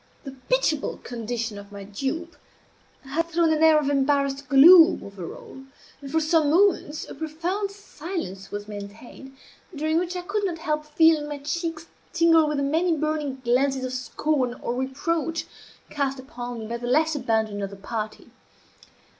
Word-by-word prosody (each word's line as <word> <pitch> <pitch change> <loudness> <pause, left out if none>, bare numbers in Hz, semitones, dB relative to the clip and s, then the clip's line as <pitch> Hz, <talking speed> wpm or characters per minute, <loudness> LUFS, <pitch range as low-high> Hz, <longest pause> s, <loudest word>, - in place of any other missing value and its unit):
The 275 - -7 0.2
pitiable 320 - +1
condition 230 -2 -4
of 200 0 -13
my 200 -1 -8
dupe 275 - -4 0.7
had 300 +5 -2
thrown 335 -1 +2
an 310 - 0
air 320 -1 +7
of 300 -2 +1
embarrassed 275 -1 +1
gloom 330 +5 +8
over 195 -4 -8
all; 265 - -12 0.4
and 275 -1 -8
for 320 - +2
some 315 -1 +2
moments 335 -3 +2
a - - -8
profound 345 +6 -3
silence 330 - -7
was 205 0 -6
maintained, 215 +6 -10 0.4
during 315 +2 +1
which 360 +1 -3
I 360 - -3
could 410 +3 -2
not 355 -4 -1
help 305 -2 -2
feeling 305 -1 +3
my 295 - -4
cheeks 325 +3 -4 0.3
tingle 330 -2 +5
with 300 -1 -1
the 280 - 0
many 325 +4 +1
burning 300 -3 -2
glances 260 +2 +1
of 255 - -4
scorn 255 0 -1
or 240 - -4
reproach 315 +5 -2 0.5
cast 275 -2 -1
upon 250 -3 -7
me 220 - -6
by 235 +2 -4
the 240 0 -6
less 310 +5 +2
abandoned 220 -6 -1
of 195 - -3
the 200 - -10
party. 215 +2 -6
290 Hz, 165 wpm, -25 LUFS, 245-320 Hz, 0.7 s, gloom